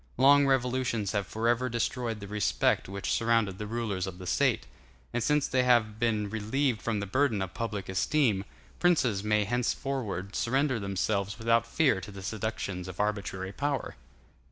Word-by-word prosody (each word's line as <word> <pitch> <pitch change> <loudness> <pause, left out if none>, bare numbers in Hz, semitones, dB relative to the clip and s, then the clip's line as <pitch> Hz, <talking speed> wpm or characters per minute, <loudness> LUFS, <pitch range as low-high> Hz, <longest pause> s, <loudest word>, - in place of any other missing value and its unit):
Long 140 +2 +6
revolutions 125 -5 +1
have 100 -3 -1
forever 120 +3 0
destroyed 120 -1 -2
the 100 - -7
respect 105 -2 +1
which 100 0 -3
surrounded 115 -4 +1
the 105 - -4
rulers 105 -5 -2
of 90 -1 -7
the 90 - -9
State; - - +1 0.5
and 120 - 0
since 150 +4 +2
they 130 - +2
have 115 -4 +3
been 110 -3 +1
relieved 110 +3 -1
from 110 -1 -1
the 100 - -3
burden 120 +1 +1
of 95 -1 -4
public 105 -1 -4
esteem, 100 +2 +1 0.4
princes 125 - +2
may 105 0 +2
henceforward 120 -4 -2
surrender 130 0 +1
themselves 100 0 -1
without 115 0 +2
fear 130 -5 +2
to 100 - -8
the 100 -1 -9
seductions 100 -3 -3
of 90 0 -9
arbitrary 100 -3 -2
power. 140 +4 -2
110 Hz, 160 wpm, -29 LUFS, 100-125 Hz, 0.5 s, Long